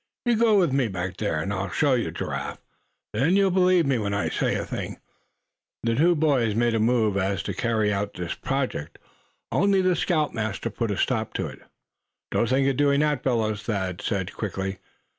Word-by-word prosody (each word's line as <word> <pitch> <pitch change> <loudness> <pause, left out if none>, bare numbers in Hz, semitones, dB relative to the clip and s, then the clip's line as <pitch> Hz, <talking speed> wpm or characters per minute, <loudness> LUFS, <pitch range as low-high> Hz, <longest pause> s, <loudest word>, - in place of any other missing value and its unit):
You 240 -1 +3
go 220 -1 +4
with 175 -8 +3
me 135 -3 +2
back 95 -1 -4
there, 100 -8 -1
and 100 +5 -2
I'll 95 0 -2
show 145 - +2
you, 115 -9 0
Giraffe. 85 - -4 0.6
Then 135 - +2
you'll 195 -1 +4
believe 180 -2 +4
me 135 -3 +1
when 100 -1 -1
I 90 -6 0
say - - 0
a - - -2
thing." - - -5 0.9
The 115 0 +1
two 170 +8 +4
boys 135 -9 +2
made 120 0 +2
a 115 - +1
move 110 -3 +2
as 95 -2 0
if - - -11
to - - -3
carry 110 -3 +1
out 100 0 -2
this 90 -1 -3
project, 135 - -3 0.5
only 200 +1 +3
the 185 -1 +3
scoutmaster 115 - -1
put 115 +1 -2
a 100 - -1
stop 110 -2 0
to - - -1
it. - - -9 0.7
"Don't 115 - +1
think 135 +1 +3
of 135 -2 +1
doing 140 0 +3
that, 150 -3 +1
fellows," 110 -5 0
Thad 95 -6 -3
said, 95 -3 -2
quickly. 95 -2 -4
115 Hz, 200 wpm, -25 LUFS, 100-145 Hz, 0.9 s, go